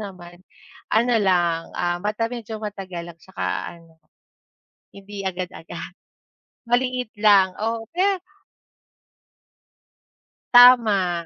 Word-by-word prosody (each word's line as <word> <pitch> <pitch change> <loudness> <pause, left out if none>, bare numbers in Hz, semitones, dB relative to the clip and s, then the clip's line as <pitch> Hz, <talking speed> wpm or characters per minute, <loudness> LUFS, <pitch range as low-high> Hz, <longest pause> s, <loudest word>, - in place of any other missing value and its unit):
naman. 175 -4 -10 0.5
Ano 235 +3 +2
lang, 175 -3 +1
ah, 175 0 -1
mata 210 +2 -1
medyo 225 -2 -6
matagal 190 -5 -7
at - - -40
saka 190 - -7 0.3
ano, 165 -1 -23 1.0
hindi 200 0 -9
agad-agad. 180 -2 -7 0.8
Maliit 250 -1 -1
lang, 200 -3 +4
oo, 225 0 -2
pe 390 +1 +1 2.4
Tama. 215 -9 +6
200 Hz, 90 wpm, -22 LUFS, 175-230 Hz, 2.4 s, Tama